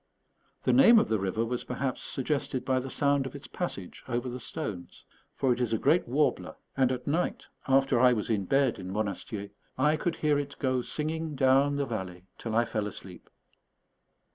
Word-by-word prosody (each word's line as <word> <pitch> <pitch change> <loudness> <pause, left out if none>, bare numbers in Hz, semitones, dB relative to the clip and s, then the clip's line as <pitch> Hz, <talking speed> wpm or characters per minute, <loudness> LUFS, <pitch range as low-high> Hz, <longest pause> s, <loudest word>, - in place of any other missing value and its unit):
The - - +3
name 245 -3 +8
of 220 - +3
the 110 -2 +1
river 95 +4 -1
was 120 +1 -3
perhaps 130 +1 -3
suggested 135 -1 -2
by 130 -1 +2
the 130 +1 -5
sound 140 0 +1
of 135 - -10
its 140 - -9
passage 100 - -5
over 120 +1 -2
the 125 +1 -5
stones; 105 - -6 0.3
for 130 -2 +2
it 125 - -4
is 120 -2 0
a - - +3
great 155 +10 +2
warbler, 145 +5 0 0.2
and 130 -2 +3
at 125 -1 -4
night, 165 +5 -1 0.2
after 135 -2 +3
I 125 0 +6
was 110 -4 -1
in 105 -4 0
bed 135 0 +2
in 95 -1 -6
Monastier, 100 0 -3 0.3
I 150 +4 +3
could 170 +2 -1
hear 150 -2 +1
it 145 0 -5
go 130 -2 0
singing 155 +3 -3
down 135 +1 +4
the 140 0 0
valley 95 -7 -5 0.2
till 115 -2 -4
I 120 +1 +4
fell 105 -2 -2
asleep. 95 -3 -9
130 Hz, 190 wpm, -29 LUFS, 110-145 Hz, 0.3 s, name